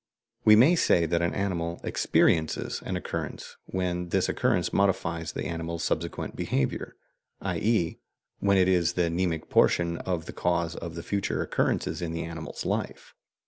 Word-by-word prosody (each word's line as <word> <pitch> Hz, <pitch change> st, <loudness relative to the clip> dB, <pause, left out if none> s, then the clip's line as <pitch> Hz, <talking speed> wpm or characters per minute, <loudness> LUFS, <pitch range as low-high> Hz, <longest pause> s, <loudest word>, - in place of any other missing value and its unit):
We 110 Hz, -, +8 dB
may 135 Hz, +11 st, +6 dB
say 85 Hz, -, +3 dB
that 85 Hz, +1 st, +1 dB
an 85 Hz, -, 0 dB
animal 85 Hz, -4 st, -2 dB
"experiences" 80 Hz, -2 st, +1 dB
an -, -, -2 dB
occurrence -, -, -5 dB
when 90 Hz, -1 st, -2 dB
this -, -, +1 dB
occurrence -, -, +1 dB
modifies 85 Hz, -4 st, 0 dB
the -, -, -4 dB
animal's 85 Hz, 0 st, -3 dB
subsequent 85 Hz, +1 st, -2 dB
behaviour, 65 Hz, -, -2 dB, 0.5 s
i.e. 105 Hz, -7 st, 0 dB, 0.4 s
when 100 Hz, -1 st, +3 dB
it 90 Hz, -1 st, +4 dB
is 90 Hz, -3 st, +3 dB
the 85 Hz, -2 st, +1 dB
mnemic 85 Hz, -2 st, -1 dB
portion 85 Hz, -1 st, +3 dB
of 90 Hz, -3 st, -2 dB
the -, -, -8 dB
cause 85 Hz, -1 st, 0 dB
of 85 Hz, 0 st, -6 dB
future 100 Hz, -1 st, -1 dB
occurrences -, -, -1 dB
in 85 Hz, -1 st, -3 dB
the 85 Hz, -, -3 dB
animal's 80 Hz, -1 st, -6 dB
life. -, -, -3 dB
85 Hz, 150 wpm, -27 LUFS, 85-95 Hz, 0.5 s, We